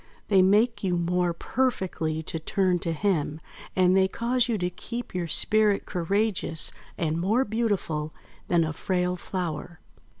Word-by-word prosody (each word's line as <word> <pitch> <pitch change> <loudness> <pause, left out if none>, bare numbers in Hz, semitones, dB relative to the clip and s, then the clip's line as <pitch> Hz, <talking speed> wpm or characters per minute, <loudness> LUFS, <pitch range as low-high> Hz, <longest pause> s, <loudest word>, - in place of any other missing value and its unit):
They 195 -3 +6
make 210 +3 +3
you 180 -2 +1
more 175 +1 +1
perfectly 170 -7 -1
to 160 - -3
turn 180 +2 +1
to 165 - -2
Him, 160 -3 0 0.4
and 185 0 +4
they 190 0 +4
cause 240 +4 0
you 225 - +1
to 180 -2 -1
keep 235 +6 -7
your 180 -2 -2
spirit 210 +4 +2
courageous 185 -2 +1 0.3
and 160 0 -1
more 220 +8 +2
beautiful 200 -9 -1 0.4
than 170 -1 +3
a 160 -1 -2
frail 180 +2 -1
flower." 175 -2 -5
180 Hz, 145 wpm, -26 LUFS, 170-210 Hz, 0.4 s, They